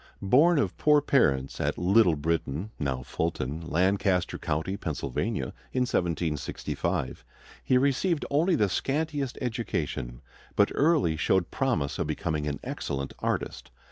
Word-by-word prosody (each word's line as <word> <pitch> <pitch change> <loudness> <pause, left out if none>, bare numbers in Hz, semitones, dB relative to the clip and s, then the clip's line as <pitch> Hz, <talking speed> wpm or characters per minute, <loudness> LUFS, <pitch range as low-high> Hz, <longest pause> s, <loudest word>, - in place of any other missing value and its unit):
Born 150 - +5
of 145 - 0
poor 150 -1 +5
parents 70 - +1
at - - 0
Little 90 -1 +4
Britain, 80 +4 -2
now 65 -3 -2
Fulton, 80 -2 -2
Lancaster 90 +2 +1
County, 80 +6 -2
Pennsylvania, 75 - -3 0.2
in 130 - +1
1765, 85 - -2 0.4
he 130 - +3
received 140 +5 +1
only 165 +5 +3
the 105 -8 +3
scantiest 145 - -1
education; 75 - -3 0.3
but - - +4
early 145 - +3
showed 95 +2 +1
promise 120 - -1
of - - 0
becoming 75 -3 -2
an 70 -1 -3
excellent 70 -1 -4
artist. - - -3
90 Hz, 125 wpm, -28 LUFS, -, 0.4 s, Born